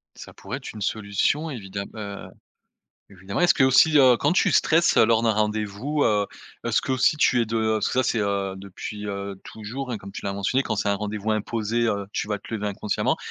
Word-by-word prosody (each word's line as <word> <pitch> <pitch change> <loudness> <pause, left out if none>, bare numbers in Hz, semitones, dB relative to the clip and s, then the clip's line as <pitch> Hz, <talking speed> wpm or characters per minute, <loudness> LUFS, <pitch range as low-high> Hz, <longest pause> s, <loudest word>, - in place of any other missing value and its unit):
Ça - - -11
pourrait - - -6
être - - -9
une 105 - -9
solution 110 +10 0
évidem 100 -6 -6
heu, 100 -2 -7 0.8
évidemment, 95 - -5
est-ce 175 0 +5
qu'aussi, 135 +3 +5
heu, 130 -3 +7
quand 145 +5 +1
tu 185 - +3
stresses, 165 +1 +3
heu, - - +7
lors 115 0 +3
d'un 115 - +3
rendez-vous, 110 +7 -1
heu, 105 -2 +2 0.4
est-ce - - +2
qu'aussi 130 +3 +2
tu 125 -4 +3
es 115 - 0
de 110 0 0
parce 110 - 0
que - - -5
ça, 130 - +3
c'est, 115 -2 0
heu, 100 -2 -1
depuis, 100 +2 -7
heu, 100 -1 -5
toujours, 120 +5 -7
hein, 115 - -3
comme 100 0 -11
tu - - -6
l'as 100 - -1
mentionné, 100 +7 0
quand 110 - -2
c'est 100 - -1
un 100 - +2
rendez-vous 105 +1 -3
imposé, 110 +1 -1
heu, 100 -2 -2
tu - - -2
vas 105 - -1
te 100 - -12
lever 105 -1 -3
inconsciemment. 100 0 -1
110 Hz, 215 wpm, -24 LUFS, 100-125 Hz, 0.8 s, heu